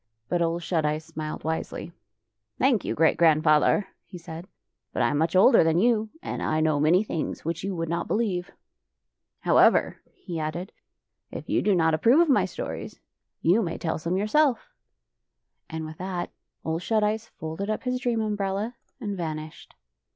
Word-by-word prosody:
" 110 +1 -50
But 175 - +1
Ole 165 0 +1
Shut 170 -1 -1
Eyes 150 +1 -1
smiled 155 -1 -6
wisely. 160 +1 -4 0.3
" 110 -1 -57
Thank 255 -5 +2
you, - - -2
Great 160 +1 +3
Grandfather," 155 +4 +4
he 185 - -11
said, 165 +1 -9 0.2
" - - -57
but - - +1
I 120 - +3
am 145 - 0
much 165 +3 0
older 195 +4 +7
than 160 0 +2
you, 220 +1 +2
and - - -4
I 155 - 0
know 155 -2 +2
many 165 +7 +4
things 165 -8 -4
which 165 +1 -3
you 195 -1 -2
would 165 -1 -2
not 170 +1 -2
believe. 195 -6 -1 0.5
" - - -58
However," - - +4
he 170 -2 -7
added, 165 +4 -4 0.3
" - - -58
if - - -8
you - - +1
do 205 -2 +2
not 160 -2 +3
approve 230 - +4
of 340 -2 +4
my 265 - +4
stories, - - -6 0.4
you 185 +7 +4
may 170 -5 -3
tell 160 -1 -2
some 170 +4 -1
yourself." 275 - +1 1.0
And 160 -1 -5
with 155 0 -9
that 180 -1 -4 0.3
Ole 160 0 -1
Shut 215 +4 +1
Eyes 215 +2 -1
folded 160 +6 -6
up 215 - -2
his 250 0 -1
dream 240 -3 0
umbrella 205 +1 -2 0.3
and 205 -2 -4
vanished. 155 -3 -6
170 Hz, 190 wpm, -26 LUFS, 155-210 Hz, 1.0 s, older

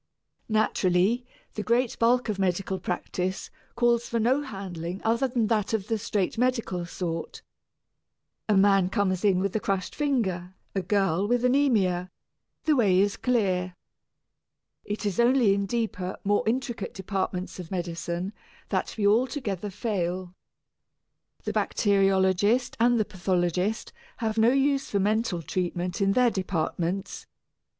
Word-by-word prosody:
Naturally 215 +2 +2 0.3
the 215 - -3
great 235 +2 +1
bulk 240 +2 +3
of 210 -3 -2
medical 190 0 0
practice 180 +1 -3 0.2
calls 235 0 +2
for 230 - 0
no 255 +6 +2
handling 190 - -6
other 235 +4 +2
than 240 -3 0
that 215 -1 0
of 210 0 -4
the 225 -1 0
straight 205 0 -1
medical 230 -9 0
sort. 165 -2 -5 1.1
A 210 - +4
man 195 -2 +4
comes 185 -1 0
in 195 -3 +4
with 195 +2 -1
a - - +2
crushed 195 -3 -2
finger, 190 -11 -1 0.2
a 195 - 0
girl 195 0 +1
with 245 +1 +1
anæmia 220 -10 +2 0.5
the 310 - +3
way 200 -8 +4
is 200 +1 +2
clear. 185 -7 0 1.1
It 210 +1 -4
is 200 -1 -1
only 240 -3 +5
in 200 0 -1
deeper, 205 -5 -2
more 205 +1 +2
intricate 240 0 -2
departments 190 -1 -3
of 175 -3 -7
medicine 175 +1 -3 0.4
that - - -1
we 210 - 0
altogether 210 - +1
fail. 185 -3 -3 1.1
The - - -3
bacteriologist 195 +3 +2
and 240 0 +4
the 215 - +2
pathologist 180 +3 -1 0.2
have 220 -1 -1
no 225 +1 +6
use 275 +1 +1
for 200 - 0
mental 205 -3 0
treatment, 180 +2 -2
in 195 0 +3
their 250 0 +4
departments. 185 0 -2
200 Hz, 135 wpm, -27 LUFS, 185-230 Hz, 1.1 s, no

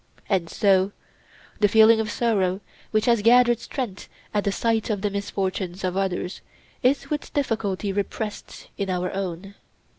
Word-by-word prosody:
And 185 -5 0
so 195 -1 +2 0.7
the 210 - +5
feeling 220 +2 +6
of 220 -1 -1
sorrow 200 -6 +1 0.3
which 215 -1 +1
has 235 -3 +3
gathered 240 +1 +5
strength 235 -5 -5 0.2
at 205 -1 0
the 200 - +2
sight 225 +2 0
of 205 -3 -1
the 205 -1 0
misfortunes 190 -2 -3
of 185 -1 -1
others 190 -1 -2 0.4
is 275 +3 +1
with 295 -1 -3
difficulty 210 -7 -1
repressed 205 +1 -5
in 195 -1 -1
our 180 0 -1
own. 190 0 -4
205 Hz, 150 wpm, -24 LUFS, 190-225 Hz, 0.7 s, feeling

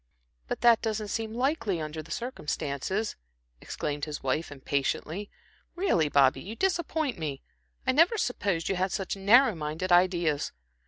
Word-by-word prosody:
"But - - -3
that 235 -2 +6
doesn't 215 -2 -2
seem 225 +1 -3
likely, 240 - 0
under 155 0 -4
the 160 - -15
circumstances," 180 - -3 0.5
exclaimed 145 -1 -3
his 150 -1 -6
wife, 135 +5 -1
impatiently. 145 +7 -2 0.5
"Really, 260 - +2
Bobby, 140 -1 +4
you 210 +5 -7
disappoint 320 - 0
me. 145 -4 -4 0.4
I 260 - +3
never 330 - +4
supposed 200 - -1
you 195 - 0
had 185 +1 0
such 195 +1 -2
narrow 220 +6 +5
minded 160 +3 -3
ideas. 175 -4 +3
185 Hz, 145 wpm, -28 LUFS, 155-230 Hz, 0.5 s, that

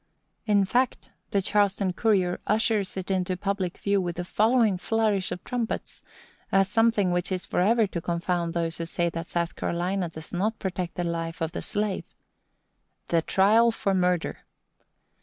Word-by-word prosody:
In 205 -2 +4
fact, 250 +5 0 0.2
the 200 -1 +1
Charleston 200 -2 +1
Courier 185 -4 +1
ushers 215 -3 +1
it 190 +1 -3
into 185 -1 0
public 195 -2 -2
view 200 -1 +1
with 175 -2 -3
the 175 - -4
following 220 -1 +3
flourish 215 -3 +1
of 180 - -5
trumpets, 240 -2 -3 0.5
as 195 0 +4
something 220 -2 +2
which 175 +2 -1
is 185 -1 -1
forever 220 +5 +3
to 180 -4 -4
confound 170 0 -1
those 165 -1 -1
who 165 - -2
say 170 0 -1
that 165 0 -5
South 170 -1 -2
Carolina 175 +1 -1
does 160 0 -9
not 215 +5 0
protect 180 -3 -4
the 175 - -2
life 165 -1 -3
of 160 0 -2
the - - -4
slave: 205 -2 -2 1.0
THE 165 -1 +3
TRIAL 215 +7 +4
FOR 205 -3 -1
MURDER. 180 -2 +1
190 Hz, 160 wpm, -26 LUFS, 175-210 Hz, 1.0 s, In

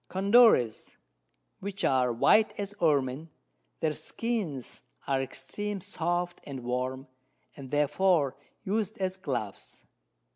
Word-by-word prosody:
Condores, 195 - +4 0.6
which 200 0 -5
are 125 -2 +3
white 215 - +4
as 200 0 -4
Ermin; 145 -1 +1 0.5
their 155 -1 +1
Skins 190 - -4 0.2
are 135 -1 +1
extreme 195 +10 -4
soft 175 -2 -2
and 135 -2 -7
warm, 130 +2 -2 0.5
and 135 -2 -9
therefore 150 +1 +2 0.3
us'd 215 +1 -1
as 190 -1 -1
Gloves. 125 - -5
160 Hz, 105 wpm, -29 LUFS, 130-195 Hz, 0.6 s, Condores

